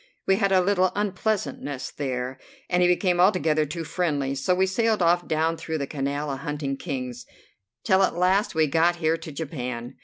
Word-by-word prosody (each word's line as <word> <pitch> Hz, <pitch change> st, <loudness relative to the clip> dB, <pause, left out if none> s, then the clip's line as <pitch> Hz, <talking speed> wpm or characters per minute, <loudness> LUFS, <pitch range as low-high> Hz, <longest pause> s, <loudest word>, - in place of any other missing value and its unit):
We 190 Hz, -, +3 dB
had 195 Hz, -2 st, +1 dB
a 190 Hz, -1 st, +5 dB
little 185 Hz, -1 st, +2 dB
unpleasantness 190 Hz, -9 st, -2 dB
there, 130 Hz, -2 st, -4 dB, 0.3 s
and 180 Hz, 0 st, +3 dB
he 180 Hz, -, +5 dB
became 180 Hz, 0 st, +2 dB
altogether 160 Hz, -5 st, +3 dB
too 165 Hz, +3 st, -5 dB
friendly, 145 Hz, -5 st, -1 dB
so 140 Hz, +7 st, +1 dB
we 190 Hz, +1 st, +3 dB
sailed 220 Hz, +3 st, +1 dB
off 175 Hz, +1 st, +2 dB
down 160 Hz, +1 st, 0 dB
through 160 Hz, 0 st, -4 dB
the 140 Hz, -, -2 dB
Canal 140 Hz, +1 st, -3 dB
a 135 Hz, -, -3 dB
hunting 145 Hz, -1 st, -3 dB
Kings, 130 Hz, -5 st, -5 dB, 0.6 s
till 190 Hz, 0 st, +3 dB
at 190 Hz, -, +2 dB
last 185 Hz, +3 st, +2 dB
we 160 Hz, 0 st, +4 dB
got 165 Hz, +4 st, +2 dB
here 165 Hz, -1 st, +1 dB
to 160 Hz, -1 st, -9 dB
Japan. 125 Hz, -5 st, -5 dB
160 Hz, 185 wpm, -25 LUFS, 140-185 Hz, 0.6 s, a